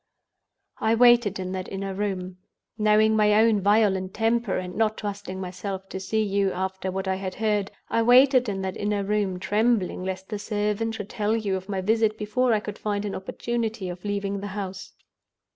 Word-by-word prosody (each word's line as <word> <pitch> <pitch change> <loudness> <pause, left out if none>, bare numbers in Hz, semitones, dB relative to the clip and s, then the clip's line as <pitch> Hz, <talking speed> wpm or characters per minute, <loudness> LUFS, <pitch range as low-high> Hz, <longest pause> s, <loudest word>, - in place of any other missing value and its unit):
"I 220 +1 +2
waited 240 -4 +5
in 185 -1 -4
that 185 -1 -5
inner 195 0 -4
room—knowing 210 +3 0
my 210 -1 +4
own 220 -1 +4
violent 195 -2 +2
temper, 225 -2 +1
and 180 0 -5
not 220 -1 +1
trusting 200 -2 -5
myself 190 +1 -5
to 190 - -5
see 220 +3 0
you, 200 -1 +1
after 190 +1 -3
what 190 +1 -3
I 190 0 0
had 190 -1 -5
heard—I 210 +1 -1
waited 250 +1 +5
in 195 -1 -3
that 190 -1 -3
inner 205 -1 -1
room, 200 -2 -1
trembling 210 -1 +1
lest 190 0 -5
the 210 -2 -4
servant 210 +1 -1
should 205 -1 -6
tell 215 +1 0
you 205 -4 -1
of 190 +1 -6
my 195 -2 -1
visit 220 +2 +2
before 235 +4 +1
I 215 - +3
could 210 0 -7
find 205 -1 -2
an 205 - -3
opportunity 225 0 -3
of 180 0 -8
leaving 200 -1 -2
the 200 - -5
house. 195 -1 -6
205 Hz, 180 wpm, -25 LUFS, 190-220 Hz, -, waited